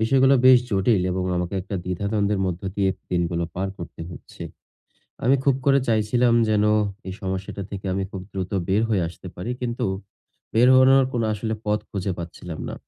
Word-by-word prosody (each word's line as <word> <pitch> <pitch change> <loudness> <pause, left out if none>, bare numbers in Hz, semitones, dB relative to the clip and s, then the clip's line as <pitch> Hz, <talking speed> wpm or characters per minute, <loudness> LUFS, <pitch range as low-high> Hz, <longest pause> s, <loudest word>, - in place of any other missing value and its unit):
বিষয়গুলো 135 +4 +4
বেশ 130 -1 +9
জটিল 100 0 +2
এবং 90 0 -1
আমাকে 90 +2 -2
একটা 100 +2 -6
দ্বিধাদ্বন্দ্বের 100 +2 -1
মধ্য 90 -1 -3
দিয়ে 95 -1 +2 0.2
দিনগুলো 85 -1 0
পার 95 +2 -2
করতে 85 - -9
হচ্ছে। 85 - -11 0.8
আমি 130 +3 +5
খুব 140 - +4
করে 140 0 +5
চাইছিলাম 115 +2 +3
যেন 105 -1 +3 0.4
এই - - -4
সমস্যাটা 95 +1 -4
থেকে 100 -1 -6
আমি 95 +1 -1
খুব 95 - -6
দ্রুত 95 -2 -4 0.2
বের 100 +3 +3
হয়ে 105 -5 +1
আসতে 90 +2 -10
পারি 90 +7 -4
কিন্তু 120 -1 -2 0.7
বের 120 +3 +5
হওয়ানোর 130 +1 +6
কোনো 120 -2 0
আসলে 110 +1 -2
পথ 105 0 +2
খুঁজে 95 -1 -2
পাচ্ছিলাম 85 -1 -7
না। - - -5
100 Hz, 170 wpm, -23 LUFS, 90-115 Hz, 0.8 s, বেশ